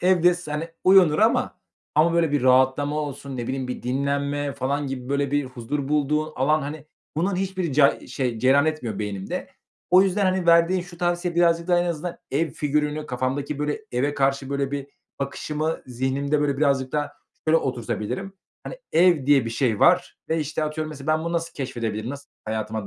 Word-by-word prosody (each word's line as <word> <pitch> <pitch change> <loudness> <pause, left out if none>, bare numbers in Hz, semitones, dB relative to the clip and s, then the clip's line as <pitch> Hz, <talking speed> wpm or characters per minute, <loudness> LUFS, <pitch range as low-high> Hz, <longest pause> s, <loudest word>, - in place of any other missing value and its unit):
Evde 180 -1 +4
s 175 -4 -7
hani, 160 +3 -3 0.2
uyunur 185 -5 +6
ama 220 +2 +2 0.3
ama, 165 +2 +4
böyle, 165 -3 +2
bir 145 -4 +1
rahatlama 130 +3 +3
olsun 140 -2 -6
ne 120 -1 -4
bileyim 130 -1 -3
bir 125 - -5
dinlenme 140 +2 -1
falan 140 +2 -2
gibi, 130 -1 -5
böyle, 140 0 0
bir 145 0 +1
huzur 130 +2 -4
bulduğun 150 +1 0
alan, 150 +3 +2
hani, 150 +2 -6 0.3
bunların 180 +3 0
hiçbiri 185 -5 -2
ca 140 0 +3
şey 125 -4 -2
cereyan 135 +5 +4
etmiyor 125 -10 -2
beynimde. 100 -2 -4 0.4
O 185 +1 +7
yüzden, 195 +1 +1
hani, 185 -2 +1
verdiğin 170 +2 +5
şu 175 -1 -13
tavsiye 175 0 -1
birazcık 170 0 +2
daha 175 -1 +4
en - - 0
azından 170 +1 -4
ev 155 +4 0
figürünü 150 +1 -1
kafamdaki, 135 +3 -2
böyle, 150 +5 -2
eve 140 +4 0
karşı, 135 0 0
böyle, 140 -1 -1
bir 140 -1 -4 0.3
bakışımı 150 +3 -3
zihnimde, 135 +4 -1
böyle, 140 -2 +1
birazcık 135 -3 +1
daha 145 -1 -1 0.4
şöyle 160 - +6
oturtabilirim. 125 - -3 0.3
"Hani, - - -7
ev 170 -5 +4
diye 140 -4 +5
bir 115 - -3
şey 115 -3 0
var - - +3
ve, 160 0 +1
işte, 155 +1 -2
atıyorum 155 0 -3
mesela 140 -1 -9
ben 155 +1 +1
bunu 170 - -2
nasıl 170 0 -2
keşfedebilirim? 115 -4 -3
Nasıl 140 0 -9 0.2
hayatıma 110 -1 -3
145 Hz, 185 wpm, -24 LUFS, 130-165 Hz, 0.4 s, O